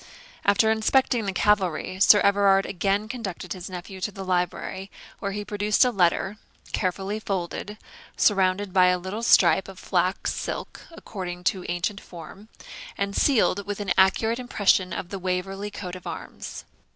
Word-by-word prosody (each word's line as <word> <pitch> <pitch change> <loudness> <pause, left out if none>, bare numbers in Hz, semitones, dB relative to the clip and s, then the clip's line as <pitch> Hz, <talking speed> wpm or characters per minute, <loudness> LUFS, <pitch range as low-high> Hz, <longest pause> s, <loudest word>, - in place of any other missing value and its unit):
After 205 +2 +4
inspecting 225 0 +2
the - - 0
cavalry, 185 -2 +1
Sir 205 +1 +7
Everard 200 -1 +4
again 200 +3 -1
conducted 215 -6 -5
his 185 -1 -8
nephew 185 +1 -8
to 210 - -1
the 195 -1 -8
library, 185 +1 -2 0.3
where 200 - -3
he 205 +1 -5
produced 210 +3 +2
a 250 - +2
letter, 195 0 +1 0.4
carefully 195 +2 -2
folded, 200 +1 -4 0.4
surrounded 195 -1 +2
by 185 -1 +6
a 180 0 +3
little 190 +5 -5
stripe 195 -4 +4
of 190 -1 -11
flox 185 0 0
silk, - - -5
according 180 - -7
to 185 0 -1
ancient 175 +3 -2
form, 180 +5 -12 0.5
and 200 0 -2
sealed 210 -7 +2
with 205 0 -4
an 200 -3 0
accurate 220 +5 +3
impression 200 -6 +2
of 175 - -5
the 195 - -5
Waverley 190 +2 -3
coat 185 -3 -7
of 180 - -10
arms. - - -7
195 Hz, 155 wpm, -25 LUFS, 185-205 Hz, 0.5 s, Sir